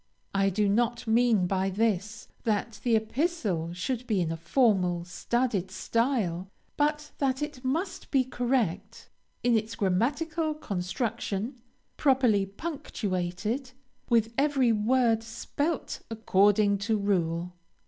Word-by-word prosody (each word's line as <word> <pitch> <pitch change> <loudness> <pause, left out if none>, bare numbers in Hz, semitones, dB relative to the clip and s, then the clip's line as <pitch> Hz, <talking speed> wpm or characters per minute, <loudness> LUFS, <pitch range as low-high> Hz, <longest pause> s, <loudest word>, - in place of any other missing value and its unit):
I 195 0 +3
do 205 +2 +1
not 235 +4 +1
mean 225 -4 +3
by 190 +1 0
this, 215 +1 -1 0.2
that 215 0 -1
the 235 -2 +3
epistle 220 - -1
should 245 +7 -3
be 210 -4 +1
in 165 -2 0
a - - -2
formal, 180 - +2
studied 205 0 -1
style, 195 -4 -1 0.3
but 300 0 0
that 270 0 +1
it 295 -4 -6
must 355 +8 -2
be 270 -2 +3
correct 235 -5 -2 0.3
in 240 -1 +4
its 220 0 -1
grammatical 300 - 0
construction, 225 +1 -3 0.4
properly 250 -8 +3
punctuated, 210 - -3 0.4
with 230 -1 +3
every 275 -4 +3
word 225 +1 +3
spelt 290 +7 -3
according 205 -2 +3
to 215 +2 +1
rule. 175 -3 0
225 Hz, 115 wpm, -28 LUFS, 195-260 Hz, 0.4 s, in